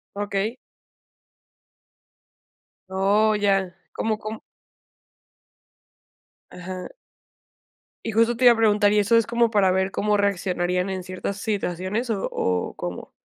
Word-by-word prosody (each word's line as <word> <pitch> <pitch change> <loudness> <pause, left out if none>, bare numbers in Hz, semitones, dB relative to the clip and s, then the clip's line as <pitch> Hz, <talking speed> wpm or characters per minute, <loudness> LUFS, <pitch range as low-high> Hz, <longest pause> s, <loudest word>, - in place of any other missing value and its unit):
Okey. 205 +3 -2 2.3
Oh, 200 +3 +2
ya, 195 -3 +1 0.2
¿cómo? 220 -1 -1
¿cómo? 215 0 -6 2.1
Ajá. 180 +1 -7 1.2
Y 225 - -1
justo 230 +2 +2
te 255 - +2
iba 240 - +9
a - - -3
preguntar, 210 -2 +3
¿y 210 - +4
eso 225 +3 +4
es 230 - +3
como 235 0 +2
para 200 -4 +3
ver 190 +1 +1
cómo 210 +1 0
reaccionarían 180 -2 0
en 190 -1 -3
ciertas 185 +2 -5
situaciones 205 +3 -2
o 200 - -2
o 90 -1 -1
cómo? - - -6
205 Hz, 120 wpm, -24 LUFS, 190-220 Hz, 2.3 s, iba